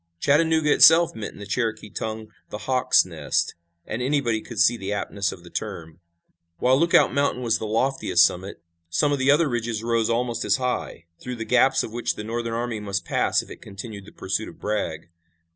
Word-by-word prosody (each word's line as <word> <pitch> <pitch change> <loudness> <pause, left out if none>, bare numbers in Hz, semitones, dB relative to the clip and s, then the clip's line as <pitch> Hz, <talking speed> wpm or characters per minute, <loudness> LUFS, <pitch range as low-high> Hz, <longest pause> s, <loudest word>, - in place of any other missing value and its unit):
Chattanooga 155 - +3
itself 165 +1 +7
meant 110 -2 -6
in - - -15
the 105 - -7
Cherokee 110 -1 -2
tongue 110 0 -5 0.2
"the - - -5
hawk's 130 -1 +3
nest," - - -2 0.3
and 115 - -4
anybody 125 -4 0
could 115 - -10
see 120 - +5
the 100 -3 -5
aptness 100 -1 -2
of 85 - -11
the 85 - -14
term. 80 -1 -6 0.6
While 130 +2 +3
Lookout 170 +1 +4
Mountain 140 -3 0
was 115 -2 +1
the 110 - -4
loftiest 110 -5 +3
summit, 90 -1 -4 0.3
some 85 +13 +1
of 145 - 0
the 130 +1 +2
other 150 +3 +4
ridges 115 -3 -3
rose 115 -1 +1
almost 120 0 -1
as 100 - +2
high, 125 -9 -3
through 125 0 -6
the 115 -1 -5
gaps 130 +3 +3
of 110 - -7
which 120 0 -2
the 105 - -6
Northern 115 +1 -3
army 120 -2 -3
must 100 -3 -3
pass - - +1
if - - -15
it - - -11
continued 100 0 -9
the - - -13
pursuit 95 +4 -3
of - - -15
Bragg. 85 -6 -3
115 Hz, 200 wpm, -24 LUFS, 105-130 Hz, 0.6 s, itself